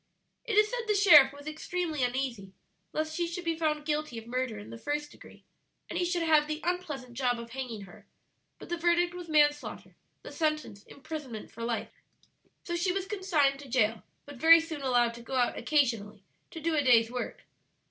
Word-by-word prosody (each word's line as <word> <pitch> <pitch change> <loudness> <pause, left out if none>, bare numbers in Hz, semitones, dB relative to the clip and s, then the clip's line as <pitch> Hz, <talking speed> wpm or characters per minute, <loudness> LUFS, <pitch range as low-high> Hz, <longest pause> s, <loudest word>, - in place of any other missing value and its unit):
"It 440 -3 -1
is 425 0 +6
said 480 -2 -3
the 420 - +2
sheriff 305 -10 +8
was 285 +1 -13
extremely 310 -1 -3
uneasy 245 -6 -2 0.4
lest 310 0 -2
she 345 0 0
should 345 +1 -6
be 330 -1 0
found 305 -2 -1
guilty 300 -5 -2
of 225 - -7
murder 250 -1 -2
in 205 - -10
the - - -8
first 295 +3 -3
degree, - - -16 0.4
and - - -3
he 355 - +1
should 350 -1 0
have 310 -2 +4
the 305 0 -3
unpleasant 310 -8 -3
job 245 -1 0
of 235 0 -9
hanging 245 -4 -5
her; 190 -3 -14 0.5
but - - -12
the 345 - -1
verdict 345 +1 +2
was 355 -2 -8
manslaughter, 295 -1 +1 0.3
the - - -9
sentence 305 -10 -2
imprisonment 275 -6 -8
for 230 - -8
life. 230 -1 -2 0.7
"So 345 - -3
she 355 +2 +1
was 380 0 -2
consigned 350 -9 +1
to 280 -2 -11
jail, 225 -3 +1 0.2
but 285 -2 -11
very 330 +1 +9
soon 320 -3 -6
allowed 245 -3 +2
to 235 - -10
go 250 +3 -6
out 245 -1 +2
occasionally 230 -7 0 0.3
to 325 - -8
do 330 +1 -1
a 295 - +3
day's 235 -4 +4
work." 250 0 -5
295 Hz, 200 wpm, -29 LUFS, 245-335 Hz, 0.7 s, very